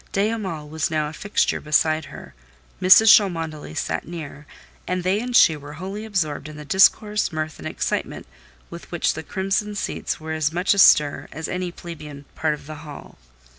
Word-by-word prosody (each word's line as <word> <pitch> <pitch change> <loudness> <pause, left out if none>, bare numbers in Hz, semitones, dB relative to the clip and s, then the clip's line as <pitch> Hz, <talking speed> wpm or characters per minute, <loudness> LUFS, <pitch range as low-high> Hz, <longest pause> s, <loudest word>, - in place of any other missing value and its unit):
De 200 +2 +1
Hamal 185 -9 -4
was 155 +1 -2
now 155 -2 -1
a - - -11
fixture 205 +6 -1
beside 155 0 +1
her; - - -12 0.5
Mrs. 210 +4 +8
Cholmondeley 165 - -2
sat 80 0 -3
near, 150 -3 -8 0.4
and 180 0 -2
they 185 +3 +1
and 245 +1 -4
she 160 - +6
were 145 0 -10
wholly 195 +7 -6
absorbed 155 -8 -2
in 155 - -10
the 150 - -9
discourse, 210 +4 +3
mirth, 155 0 -4
and - - -6
excitement, - - -3 0.5
with 170 - -10
which 175 - 0
the 160 - -6
crimson 195 +5 -2
seats - - -3
were 160 0 -5
as 155 -1 0
much 180 +4 +1
astir 150 -7 +4
as 160 +1 -5
any 180 0 -3
plebeian 150 -5 -10
part 155 -1 -1
of 150 - -16
the 155 +1 -8
hall. 150 -3 -11
160 Hz, 180 wpm, -22 LUFS, 150-190 Hz, 0.5 s, Mrs